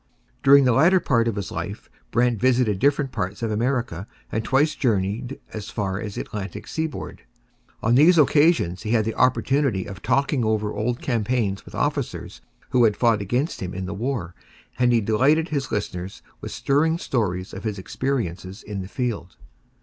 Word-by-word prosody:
During 140 +1 +7
the 125 - +4
latter 170 +10 +5
part 115 -8 +1
of 115 - -1
his 100 -3 -4
life - - -5 0.2
Brant 120 -1 +1
visited 120 -5 +2
different 140 +1 +2
parts 100 +2 -4
of 115 - -1
America 115 -5 -1 0.2
and 110 - -1
twice 140 +6 +2
journeyed 115 +2 -1
as 110 -2 -6
far 100 -3 -2
as 105 -2 -6
the - - -2
Atlantic 100 -2 -6
seaboard. 160 -1 -4 0.6
On 110 - +3
these 160 +7 +6
occasions 145 - +3
he 110 - -2
had 110 -3 +3
the 115 - -1
opportunity 130 -4 +1
of 95 0 -9
talking 140 0 +1
over 110 -1 0
old 120 +3 -2
campaigns 115 -4 -1
with - - -11
officers - - -3 0.3
who 125 - +4
had 105 -2 +2
fought 115 -4 +3
against 125 - -1
him 90 -1 -5
in 95 0 -4
the 90 - -4
war, 105 -5 -3 0.5
and 125 -1 +4
he 115 -1 +3
delighted 135 - +2
his 140 -3 -2
listeners 95 -2 -4 0.2
with - - -6
stirring 160 +4 +1
stories 95 - -2
of 95 - -7
his 105 -3 -3
experiences 95 -4 -3
in 100 -2 -5
the 95 - -7
field. 105 -7 -4
115 Hz, 175 wpm, -23 LUFS, 100-135 Hz, 0.6 s, During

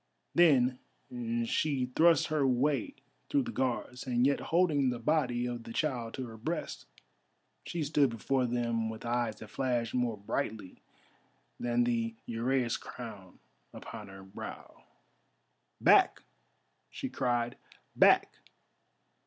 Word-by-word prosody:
Then 130 -7 +4 0.7
she 130 -1 0
thrust 165 -3 +5
her 150 -3 +2
way 145 - +1 0.3
through 285 -2 +2
the 245 - -5
Guards, 130 - -2
and 120 0 +2
yet 140 +1 +3
holding 160 -6 +3
the 125 - -2
body 125 -2 +1
of 120 -1 -4
the 115 - -9
child 120 -7 -2
to 130 - -4
her 115 -2 -10
breast, 155 +9 -4 0.8
she 170 -2 -2
stood 145 -2 +3
before 125 +3 0
them 115 -2 -1
with 110 +1 -7
eyes 120 -2 0
that 110 - -12
flashed 120 -4 -1
more 125 -3 0
brightly 100 0 -4 0.8
than 120 0 +1
the 115 -1 0
uraeus 120 +1 0
crown 105 -7 -9 0.4
upon 105 - -8
her 95 0 -11
brow. 95 - -10 0.9
"Back!" - - +5 0.7
she - - -5
cried, 120 -1 -1 0.4
"back! - - +5
125 Hz, 125 wpm, -31 LUFS, 115-140 Hz, 0.9 s, thrust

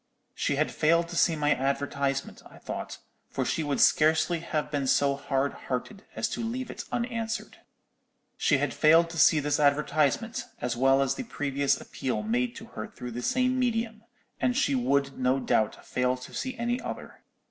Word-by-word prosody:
She - - -1
had - - +1
failed 170 +2 +2
to 175 - -6
see 170 -1 +3
my 150 -1 +2
advertisement, 140 +1 -2
I - - -15
thought; - - -6 0.3
for - - -2
she 160 - 0
would 145 -2 -1
scarcely 160 +2 +4
have 155 -2 -3
been 140 -3 -1
so 140 +1 +3
hard 140 0 -1 0.2
hearted 165 +11 -4
as - - 0
to 230 - -4
leave 245 +2 -3
it - - -7
unanswered. 230 -2 -3 0.8
She - - +2
had - - -1
failed 165 +2 +5
to 165 - -4
see 165 -2 +6
this 145 0 0
advertisement, 150 +8 +1
as 120 0 -2
well 135 +2 +4
as 135 - 0
the - - -5
previous 140 - 0
appeal 130 +9 -3
made 240 +2 0
to 225 - -9
her - - -5
through 125 - -8
the 120 +1 -5
same 255 - +1
medium, 225 -3 -1 0.4
and 250 0 +1
she 140 - +2
would 135 +2 +1
no 130 +1 +2
doubt 110 -4 0
fail 125 0 0
to 125 - -11
see 260 -1 -4
any 240 +2 -1
other. - - -7
150 Hz, 180 wpm, -28 LUFS, 135-225 Hz, 0.8 s, see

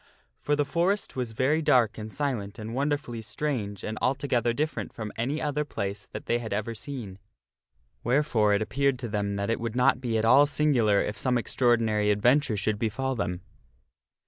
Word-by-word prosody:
For 145 - +1
the 145 0 +1
Forest 175 +7 0
was 125 -3 -3
very 140 +8 +2
dark 125 -8 +3
and 110 0 -6
silent 120 -8 -3
and 110 0 -6
wonderfully 135 -4 -2
strange 110 -5 -3
and 110 0 -4
altogether 125 -3 +1
different 150 +6 -2
from 110 -2 -6
any 135 +7 -1
other 150 -1 -1
place 100 -7 -5
that - - -8
they 120 - +1
had 115 -2 -6
ever 105 +3 -2
seen. 110 -5 -7 0.8
Wherefore 120 -5 +2
it 105 - +1
appeared 140 +3 +1
to 120 -1 -5
them 100 -2 -2
that 100 +2 -1
it - - -1
would 115 0 -4
not 125 0 +3
be 115 -3 0
at 110 - +1
all 135 +5 +6
singular 125 -9 +3
if 105 - -3
some 125 -2 +1
extraordinary 115 -3 +2
adventure 120 +3 +3
should 105 +1 0
befall 130 +4 -1
them. 90 -7 -3
120 Hz, 180 wpm, -27 LUFS, 105-140 Hz, 0.8 s, all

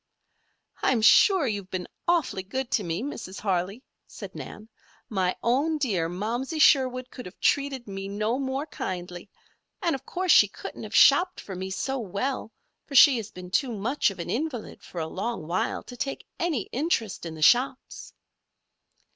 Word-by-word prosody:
"I'm 235 -4 +2
sure 375 - +6
you've 205 -5 -3
been 185 -1 -4 0.2
awfully 335 - +1
good 260 +7 -4
to 210 - +1
me, 170 +5 -3
Mrs. 195 -9 -6
Harley," 195 +4 -1 0.2
said - - -9
Nan. 215 - -9 0.4
"My 185 -4 0
own 285 +7 +2
dear 195 - 0
Momsey 235 - -3
Sherwood 255 -4 +4
could 250 - -8
have 180 - -14
treated 275 -4 +1
me 195 -1 -5
no 215 +5 -1
more 270 +1 -2
kindly. 180 - -6 0.5
And, 345 -3 0
of 270 -1 -4
course, 365 +4 0
she - - +8
couldn't - - -9
have - - -6
shopped 360 0 +6
for 195 - -7
me 190 +1 -5
so 265 +8 -2
well, 225 +4 -3 0.4
for 280 - -7
she 270 -1 +8
has 215 -2 -5
been 180 -2 -10
too 260 +4 +1
much 230 +6 0
of 195 - -9
an 170 - -4
invalid 260 -4 -4
for 175 - -8
a 160 - -1
long 195 +2 -4
while 175 +3 -1
to 245 - -10
take 275 +3 -4
any 320 - 0
interest 250 - -1
in 165 -2 -6
the 155 - -3
shops." 255 - +2
235 Hz, 170 wpm, -26 LUFS, 190-275 Hz, 0.5 s, she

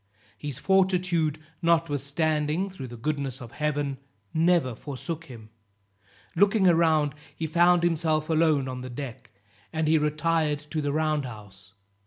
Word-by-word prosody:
His 145 -4 -5
fortitude, 180 -5 +2 0.2
notwithstanding, 155 +1 +1
through 135 -9 -7
the 120 0 -9
goodness 140 0 -3
of 120 -3 -10
Heaven, 145 -3 -2 0.3
never 165 -5 +3
forsook 150 +6 -6
him; 115 -6 -12 0.8
looking 200 +2 +4
around, 160 -4 +3 0.2
he 160 - -3
found 175 +2 +4
himself 160 -2 +1
alone 155 -4 +2
on 130 -1 -5
the 130 - -7
deck, 125 -1 -7 0.4
and 160 -1 -1
he 160 0 +4
retired 155 0 +1
to 155 - -1
the 145 -1 -1
round 155 -1 0
house. 100 -4 -11
155 Hz, 135 wpm, -26 LUFS, 140-165 Hz, 0.8 s, looking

